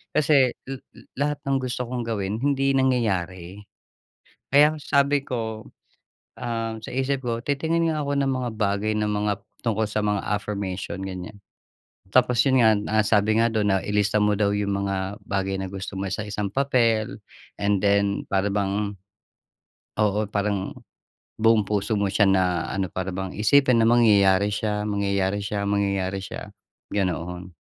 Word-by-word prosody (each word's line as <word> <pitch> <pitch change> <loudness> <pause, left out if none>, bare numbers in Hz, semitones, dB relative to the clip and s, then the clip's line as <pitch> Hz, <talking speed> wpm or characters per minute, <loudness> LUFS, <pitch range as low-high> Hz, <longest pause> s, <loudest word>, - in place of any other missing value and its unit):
kasi 140 -4 +4
la 135 0 -4 0.4
lahat 145 +1 0
ng 135 0 +2
gusto 125 0 -2
kong 125 0 -3
gawin 105 -1 -2
hindi 135 0 +1
nangyayari. 100 -8 -1 0.9
Kaya 150 +2 +6
sabi 140 0 +2
ko, 110 -4 -4 0.8
ah, 115 -1 -3
sa - - -7
isip 135 +1 -1
ko, 115 -1 -2
"Titingin 160 +6 0
nga 155 -1 -2
ako 140 0 0
ng 135 - +1
mga 130 -2 -2
bagay 105 0 0
na 105 0 0
mga 105 -1 -1 0.2
tungkol 110 -2 0
sa 105 0 -1
mga 105 -1 +1
affirmation," 100 -2 -3
ganyan. 95 +2 -6 0.8
Tapos 125 -2 +3
'yon 130 -1 +4
nga 110 - +6
na 105 +1 +1
sabi 105 +1 +2
nga 115 - +3
do'n 110 -2 +1
na - - +3
ilista 105 0 0
mo 105 0 +3
daw 100 -1 +2
yung 100 -1 -1
mga 95 +1 -3
bagay 95 -1 -1
na 95 - -3
gusto 95 0 -6
mo 100 - -2
sa 105 - -2
isang 105 0 -3
papel 115 -4 +1 0.4
and 100 -1 +1
then 100 0 +2
para 100 +1 +2
bang 100 0 -1 1.0
Oo, 105 0 +1
parang 100 -1 -2 0.6
buong 110 0 +4
puso 105 +1 -1
mo 100 -2 +1
siya 105 +2 +3
na 90 -3 +2
ano, 95 -2 -1
para 95 +2 -4
bang 95 0 -5
isipin 125 +4 +4
na 115 - +4
mangyayari 105 -4 +4
siya, 105 0 -1
mangyayari 100 -1 0
siya, 100 0 -2
mangyayari 100 -1 0
siya, - - -8 0.4
ganoon. 90 -2 -3
105 Hz, 155 wpm, -24 LUFS, 100-120 Hz, 1.0 s, Kaya